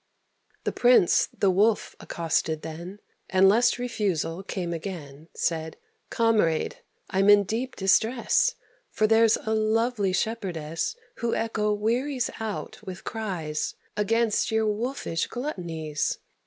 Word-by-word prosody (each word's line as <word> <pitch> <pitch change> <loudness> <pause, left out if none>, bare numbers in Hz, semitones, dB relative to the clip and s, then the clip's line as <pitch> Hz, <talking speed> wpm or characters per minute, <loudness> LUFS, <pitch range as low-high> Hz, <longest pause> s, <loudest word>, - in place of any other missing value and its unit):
The - - -1
Prince 245 -8 +4
the 195 - +1
Wolf 205 +4 +2
accosted 160 -1 -1
then, 170 +6 -8 0.3
And, 190 0 +5
lest 235 +5 +4
refusal 200 -8 -2
came 180 -3 -4
again, 160 -4 -7
Said, 160 -1 -2 0.3
"Comrade, 215 -9 +1 0.3
I'm 195 +1 +3
in 205 0 +7
deep 235 +6 -3
distress, 230 - +2 0.3
For 215 - +1
there's 225 0 +5
a 220 - 0
lovely 220 -1 +1
shepherdess 180 - -2 0.2
Who 235 -1 -1
echo 210 -2 0
wearies 245 +5 0
out 220 -2 -5
with 185 -1 -8
cries 180 -9 -3 0.2
Against 225 +1 +1
your 220 0 +2
wolfish 215 -5 -2
gluttonies. 165 - -3
205 Hz, 115 wpm, -26 LUFS, 170-225 Hz, 0.3 s, in